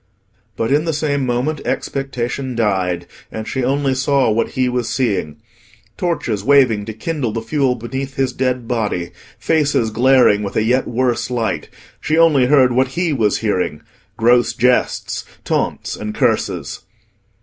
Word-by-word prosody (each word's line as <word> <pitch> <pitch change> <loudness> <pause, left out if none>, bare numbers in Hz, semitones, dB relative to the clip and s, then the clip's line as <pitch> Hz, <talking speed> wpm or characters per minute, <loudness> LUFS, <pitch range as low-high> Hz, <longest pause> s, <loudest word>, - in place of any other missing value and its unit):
But 115 +2 -1
in 150 +3 +2
the 165 - 0
same 145 -3 -1
moment 130 +5 -1
expectation 130 -1 -3
died, 95 -6 0 0.3
and 110 0 -6
she 130 - -2
only 135 +1 +1
saw 130 -1 +2
what 110 +2 +1
he 130 -1 +2
was 125 -2 -1
seeing—torches 115 - -3
waving 125 -6 +4
to 110 - -6
kindle 130 +1 -3
the 115 - -2
fuel 135 0 +1
beneath 130 +3 -5
his 135 -2 0
dead 125 -2 -1
body, 105 -8 -2 0.3
faces 145 -8 +1
glaring 125 -3 +4
with 100 -1 -5
a 110 - +2
yet 125 +4 +1
worse 120 0 0
light; 120 -3 -2 0.3
she 155 - 0
only 155 -6 +5
heard 130 -3 +5
what 130 +2 +2
he 170 +4 -1
was 110 -6 +1
hearing—gross 115 +5 0
jests, 125 +1 0 0.2
taunts, - - -1
and 105 0 -6
curses. - - -1
125 Hz, 145 wpm, -18 LUFS, 110-135 Hz, 0.3 s, only